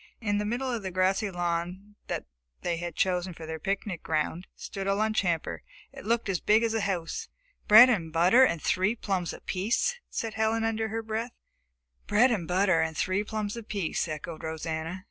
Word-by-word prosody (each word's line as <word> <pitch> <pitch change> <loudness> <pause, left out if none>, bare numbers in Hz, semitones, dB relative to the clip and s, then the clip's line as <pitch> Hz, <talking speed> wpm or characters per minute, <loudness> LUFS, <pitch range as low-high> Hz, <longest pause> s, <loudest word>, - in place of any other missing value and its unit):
In 205 -3 0
the 210 - -1
middle 250 +4 -1
of 230 - -2
the 190 - -4
grassy 190 +3 +1
lawn 175 +3 -3
that - - -3 0.4
they 170 -1 0
had 170 -1 -5
chosen 180 -1 0
for 160 - -8
their 160 0 -5
picnic 195 0 -3
ground 160 +3 -2
stood 195 -1 -6
the 195 - +2
lunch 215 +1 +1
hamper. 170 -4 -1 0.3
It - - -10
looked 235 0 +1
as 190 -4 0
big 215 +2 +3
as 225 -1 +1
a 225 - 0
house! 180 -5 -3 0.4
"Bread 220 +4 +10
and 180 -10 0
butter 180 +10 +5
and 170 -10 +2
three 190 +8 +1
plums 190 -6 -2
apiece," 235 - -1
said 225 -1 -3
Helen 220 +1 +1
under 225 0 0
her 225 +1 -3
breath. 225 +2 -3 0.7
"Bread 240 +5 +4
and 185 -8 -1
butter 185 -2 +3
and 160 -1 -2
three 190 +2 0
plums 210 0 -3
apiece," 205 -8 -2
echoed 155 +1 -6
Rosanna. 160 +2 -4
195 Hz, 185 wpm, -28 LUFS, 170-220 Hz, 0.7 s, Bread